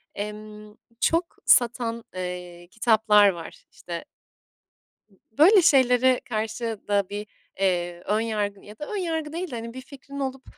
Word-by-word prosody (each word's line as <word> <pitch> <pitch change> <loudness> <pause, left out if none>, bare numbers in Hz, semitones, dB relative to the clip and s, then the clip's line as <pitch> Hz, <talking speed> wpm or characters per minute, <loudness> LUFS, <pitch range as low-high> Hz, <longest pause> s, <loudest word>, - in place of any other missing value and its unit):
Emm, 210 0 -7 0.2
çok 335 +6 +1
satan, 235 -1 +3
eee, 180 -1 -6
kitaplar 215 -2 +4
var. 170 -3 -8
İşte 170 -1 -7 1.3
böyle 360 - +6
şeylere 260 -5 +4
karşı 220 0 -3
da 200 -2 +1
bir, 205 +1 -5 0.3
eee, 175 -2 0
ön 210 +1 +1
yargın 210 -3 -2
ya 210 +1 -14
da 295 - -4
ön 420 - -4
yargı 320 -4 -3
değil 345 -1 -4
de, - - -4
hani, 230 0 -6
bir 260 - -7
fikrin 280 +1 -11
olup, 265 -1 -4
220 Hz, 140 wpm, -25 LUFS, 205-265 Hz, 1.3 s, böyle